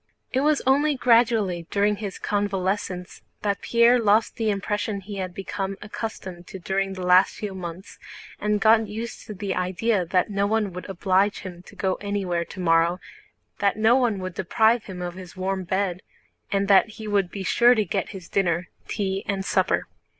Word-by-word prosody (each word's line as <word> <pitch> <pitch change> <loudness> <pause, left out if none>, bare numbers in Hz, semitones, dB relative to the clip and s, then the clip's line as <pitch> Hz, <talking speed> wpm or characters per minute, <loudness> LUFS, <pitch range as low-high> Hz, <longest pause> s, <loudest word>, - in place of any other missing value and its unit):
It 260 - +2
was 300 +1 +2
only 285 +3 +3
gradually 230 -9 +2
during 205 +1 +1
his 200 -3 -5
convalescence 195 -2 -2 0.2
that 200 -1 0
Pierre 235 +1 +4
lost 215 0 +3
the 225 -2 0
impressions 205 0 -2
he 205 -1 -6
had 185 -1 -3
become 195 +1 -4
accustomed 190 -4 -7
to - - -8
during 195 +1 -1
the 185 -1 -5
last 180 +1 +5
few 205 -2 -5
months 180 0 -8 0.4
and 210 0 +1
got 220 +1 +4
used 220 +2 -6
to 210 - -7
the 195 0 -3
idea 185 +3 0
that 180 +4 +1
no 200 0 +1
one 210 -3 0
would 180 +2 -8
oblige 195 +2 +1
him 180 -2 -8
to - - -14
go 190 -1 -1
anywhere 195 -4 -1
tomorrow, 170 -1 +1 0.6
that 200 0 +2
no 220 +2 +5
one 240 -5 +2
would 185 -1 -5
deprive 220 +6 +2
him 180 -2 -6
of 175 0 -4
his 185 0 -11
warm 190 0 -2
bed, 190 0 -1 0.5
and 200 0 +1
that 200 +2 +5
he 220 - -7
would 200 -3 +1
be 195 0 -6
sure 240 +5 +5
to 215 -2 +1
get 195 +1 -2
his 190 -4 -9
dinner, 180 -3 0 0.2
tea, 195 -2 -2
and 195 -1 -2
supper. - - +1
195 Hz, 180 wpm, -24 LUFS, 185-215 Hz, 0.6 s, last